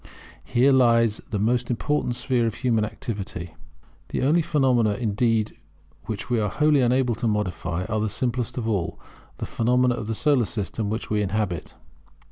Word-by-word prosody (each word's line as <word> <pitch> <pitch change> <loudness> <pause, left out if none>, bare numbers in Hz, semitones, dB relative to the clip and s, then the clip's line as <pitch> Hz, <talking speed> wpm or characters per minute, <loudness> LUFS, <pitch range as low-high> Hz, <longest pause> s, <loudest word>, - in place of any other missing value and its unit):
Here 125 +3 +3
lies 115 -4 +4
the 105 - -2
most 120 +4 +1
important 125 +1 0
sphere 120 -1 +1
of 110 - -3
human 115 -4 +1
activity. 100 -6 -5 0.6
The - - -2
only 155 +6 +4
phenomena, 130 -10 +2
indeed, 110 -1 0 0.5
which 105 -1 -5
we 120 -2 +1
are 105 -1 0
wholly 150 +1 +3
unable 125 0 +2
to 115 +2 -2
modify 95 -4 -2
are 110 -1 -1
the 110 0 0
simplest 120 +2 -2
of 115 -3 -2
all, 100 -7 -1 0.4
the - - -4
phenomena 125 +2 +2
of 110 -3 -5
the 110 - -2
Solar 130 +1 +2
System 105 0 -3
which 110 +1 -4
we 105 -1 +2
inhabit. 100 -4 -2
115 Hz, 165 wpm, -24 LUFS, 105-125 Hz, 0.6 s, lies